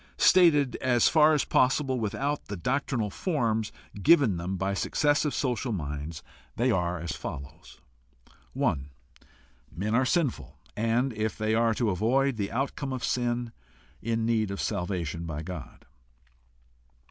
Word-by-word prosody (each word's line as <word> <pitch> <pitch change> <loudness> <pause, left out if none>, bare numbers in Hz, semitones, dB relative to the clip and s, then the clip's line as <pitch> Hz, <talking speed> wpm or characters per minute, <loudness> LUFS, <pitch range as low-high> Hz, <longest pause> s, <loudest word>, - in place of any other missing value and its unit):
Stated 150 -8 +5
as 125 -2 +3
far 155 -1 +5
as 145 - +1
possible 130 0 +2
without 140 +7 -2
the 100 - -6
doctrinal 125 0 -1
forms 110 - -1 0.3
given 130 - +5
them 90 +3 -3
by 95 +2 -1
successive 145 +8 +1
social 125 -3 -1
minds, 75 -3 -5 0.3
they 125 +2 +2
are 90 -3 0
as 85 -1 -4
follows: 70 -2 -8 0.7
1. 70 +1 -1 0.8
Men 100 +7 -3
are 125 +3 +4
sinful, 160 -6 -1 0.2
and, 115 +4 +1
if 110 0 -2
they 110 0 0
are 115 0 +2
to 115 -3 +1
avoid 125 +7 +1
the 100 -2 -2
outcome 135 +2 -2
of 125 -2 -4
sin, 120 0 -1 0.5
in 115 0 -1
need 110 -3 +1
of 100 - -5
salvation 85 -3 -3
by 75 -1 -4
God. 85 -5 -8
115 Hz, 135 wpm, -28 LUFS, 95-130 Hz, 0.8 s, Stated